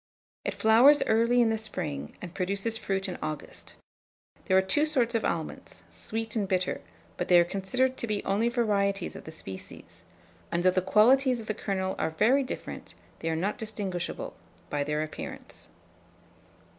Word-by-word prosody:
It - - -3
flowers 245 +7 +6
early 235 +2 +3
in 225 - +2
the 220 - 0
spring, 75 - -5
and 175 -1 -7
produces 200 +4 0
fruit 195 -2 -2
in 180 - -5
August. 155 -1 -6 0.7
There 190 - +4
are - - +6
two 195 +11 +1
sorts 255 -6 +2
of 230 - +1
almonds, 165 -2 -4
sweet 225 +1 -3
and 205 -3 0
bitter; 185 -1 0 0.4
but - - -2
they 175 -1 +7
are 170 - +4
considered 250 +9 0
to 235 - -3
be 210 -2 -1
only 215 +4 +2
varieties 200 -5 0
of - - -9
the 160 - -7
species; 95 -12 -9 0.5
and 170 +1 0
though 185 - +5
the 185 - +1
qualities 245 +7 +4
of 225 - -7
the 215 - -1
kernels 190 -2 -2
are 160 - +1
very 220 - +3
different, 260 - -6 0.2
they 165 - -2
are 160 - 0
not 190 +8 -1
distinguishable 205 -5 -3 0.4
by 145 -1 0
their 150 +1 -1
appearance. 155 - -8
200 Hz, 170 wpm, -28 LUFS, 180-230 Hz, 0.7 s, they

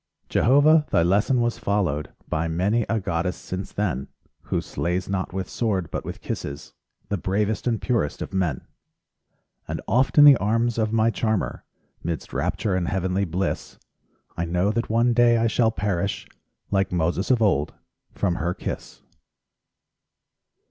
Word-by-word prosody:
Jehovah, 150 +5 +4
thy 85 - +3
lesson 105 +8 +2
was 120 0 -1
followed 90 -8 -1 0.2
By 80 +1 -1
many 100 +8 0
a 115 +1 +1
goddess 90 -1 -2
since 95 +1 -6
then, 90 -11 -2 0.4
Who - - 0
slays 90 +2 -2
not 95 -1 -2
with 95 0 -3
sword, 95 -8 -1
but - - -3
with - - -7
kisses 70 +1 -6 0.4
The 100 -2 -1
bravest 105 +6 -1
and 115 -3 +1
purest 115 - -1
of - - -9
men. 90 -8 0 1.1
And - - -3
oft 130 +8 +2
in 145 - +10
the 140 -3 +9
arms 115 +3 0
of 110 -1 +1
my 115 0 +3
charmer, 110 -2 -1 0.4
'Midst 85 -1 -4
rapture 100 - -1
and 90 -2 -1
heavenly 95 +1 0
bliss, 90 +2 -3 0.6
I 85 - -2
know 90 +4 +1
that 115 +2 -2
one 115 +2 +3
day 120 0 +5
I 115 - +2
shall 115 0 +3
perish, 100 -3 -2 0.5
Like 95 -1 +1
Moses 90 +2 0
of 125 -3 +4
old, 80 -9 +1 0.4
from 90 -4 -1
her 90 +1 -1
kiss. - - -6
100 Hz, 155 wpm, -24 LUFS, 90-115 Hz, 1.1 s, in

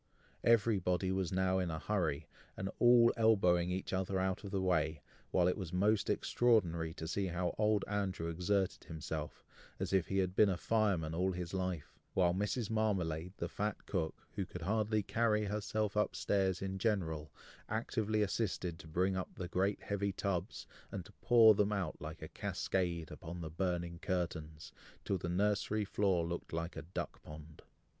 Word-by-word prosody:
Every 115 -2 +4
body 90 +1 0
was 95 -1 -1
now 95 0 +2
in 90 -2 -1
a 80 - -3
hurry, 80 -6 -1 0.3
and 95 +1 -3
all 120 -1 +7
elbowing 90 -6 +4
each 95 +1 -3
other 95 0 0
out 95 +1 -1
of 100 - -5
the 100 -1 -1
way, 80 -4 +1 0.3
while 90 -1 +3
it 90 - +2
was 95 -5 -5
most 100 +3 +2
extraordinary 85 -9 +2
to 80 - -5
see 95 +3 -1
how 90 0 -1
old 105 -1 +3
Andrew 95 -5 -1
exerted 90 +3 0
himself, 80 -1 -5 0.3
as - - -2
if 95 -3 +3
he 95 - -1
had 95 -1 +1
been 105 0 +6
a 90 - 0
fireman 100 -8 +1
all 95 +3 +1
his 90 -1 -5
life, 90 -5 -3 0.2
while 90 -2 +4
Mrs. 105 +4 -1
Marmalade, 90 -6 0
the 85 - -2
fat 105 +3 -3
cook, 80 -5 -1 0.2
who 100 - -2
could 90 -1 -8
hardly 110 +2 +1
carry 105 0 +1
herself 105 0 -1
up 105 - +1
stairs 95 -2 +1
in 95 0 -3
general, 80 -8 -1 0.4
actively 110 -1 0
assisted 95 -5 -2
to - - -11
bring 90 +4 +1
up 95 - -4
the 90 - -4
great 95 +3 0
heavy 100 0 -1
tubs, 95 0 -3 0.3
and 95 -3 -5
to - - -14
pour 115 -3 +7
them 105 0 +2
out 95 -6 -2
like 80 +2 -7
a - - -5
cascade 85 -4 -2
upon 85 +2 -7
the 80 -2 -5
burning 85 -1 -2
curtains, 80 -5 -3 0.3
till 95 - 0
the 85 - -3
nursery 105 +3 +1
floor 95 -4 +1
looked 85 +1 -5
like 85 +2 -3
a 80 - -4
duck 85 +4 -5
pond. 75 0 -11
95 Hz, 180 wpm, -35 LUFS, 85-105 Hz, 0.4 s, all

